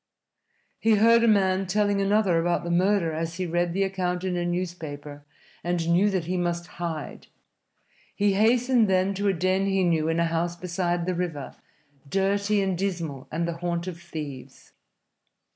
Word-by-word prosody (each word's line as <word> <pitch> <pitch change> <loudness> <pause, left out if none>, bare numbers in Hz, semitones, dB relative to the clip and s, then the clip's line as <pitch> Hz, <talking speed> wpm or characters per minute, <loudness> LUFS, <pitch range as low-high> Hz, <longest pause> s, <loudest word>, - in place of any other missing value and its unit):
He 225 -1 +4
heard 230 +2 +5
a - - +4
man 190 -3 +3
telling 205 +1 +1
another 195 -3 +2
about 175 +1 0
the 170 - -3
murder 180 -1 +2
as 165 +1 -3
he 185 +1 -2
read 175 0 0
the 195 +3 +1
account 180 -2 -2
in 185 -1 -1
a 175 - -1
newspaper, 155 -5 -5 0.4
and 175 -1 -1
knew 185 +5 +4
that 185 -4 -1
he 180 +2 -2
must 175 -1 -1 0.2
hide. 160 -3 -5 0.9
He 205 -1 +2
hastened 235 +3 +3
then 190 +1 +2
to 200 +1 -1
a 195 - +3
den 185 +2 +1
he 195 -1 +1
knew 165 -3 +1
in 165 +1 0
a 170 - +3
house 170 +1 -1
beside 175 -1 -2
the 185 - 0
river, 170 -6 -4 0.6
dirty 200 +3 +1
and 190 -1 0
dismal 170 -8 -3
and 170 +2 -1
the 170 -1 -4
haunt 170 0 -2
of 175 -2 -7
thieves. 145 -6 -8
180 Hz, 175 wpm, -26 LUFS, 170-195 Hz, 0.9 s, heard